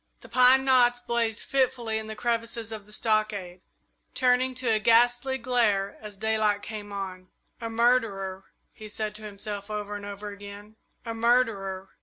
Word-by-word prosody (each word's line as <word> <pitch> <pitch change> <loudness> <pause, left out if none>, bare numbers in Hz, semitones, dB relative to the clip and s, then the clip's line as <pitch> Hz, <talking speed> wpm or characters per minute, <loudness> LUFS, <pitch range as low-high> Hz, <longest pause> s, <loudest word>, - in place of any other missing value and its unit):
The - - -14
pine 255 +1 +6
knots 245 -2 +4
blazed 235 -3 -1
fitfully 250 -4 0
in 220 - -6
the 220 - -6
crevices 230 0 -2
of 210 -2 -7
the - - -16
stockade, 210 -5 -1 0.5
turning 255 0 +2
to 250 -2 0
a 215 - +3
ghastly 245 +4 +3
glare 230 -6 +1
as 210 -2 -8
daylight 215 -1 +1
came 210 -2 -7
on. 185 -2 -6 0.3
"A 230 - -3
murderer!" 225 -5 +1 0.3
he 215 - -10
said 215 0 -3
to - - -11
himself 205 0 -6
over 210 -1 -4
and 205 - -7
over 205 +1 -6
again; 205 +1 -10 0.3
"a 230 - -3
murderer!" 225 -5 +1
220 Hz, 160 wpm, -27 LUFS, 205-240 Hz, 0.5 s, pine